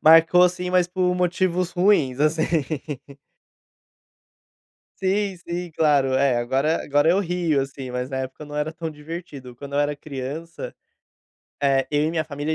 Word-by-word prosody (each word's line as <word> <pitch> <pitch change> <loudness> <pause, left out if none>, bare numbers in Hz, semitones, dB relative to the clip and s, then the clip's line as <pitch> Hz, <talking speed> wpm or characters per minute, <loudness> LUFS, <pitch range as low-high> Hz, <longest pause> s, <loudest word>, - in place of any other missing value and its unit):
Marcou, 165 +3 +7
assim, 180 0 +1
mas 180 -1 +3
por 180 0 +1
motivos 180 0 0
ruins, 175 -8 +3
assim. 155 +1 +2 2.5
Sim, 195 0 0
sim, 175 0 -5
claro. 145 -4 +3
É, 135 -1 +3
agora 135 +7 +1
agora 145 +3 +3
eu 185 - +3
rio, 175 -6 +1
assim, 135 -1 -5
mas 125 0 -3
na 135 -1 -3
época 130 +3 -5
não 150 0 -10
era 150 +2 -1
tão 165 0 -5
divertido. 150 -5 -8
Quando 140 +2 -9
eu 145 - +3
era 145 0 0
criança, 145 +4 -6 0.9
eh, 135 -1 +3
eu 145 0 +2
e 155 - +1
minha 160 -1 -1
família 150 +1 -3
155 Hz, 155 wpm, -23 LUFS, 140-175 Hz, 2.5 s, Marcou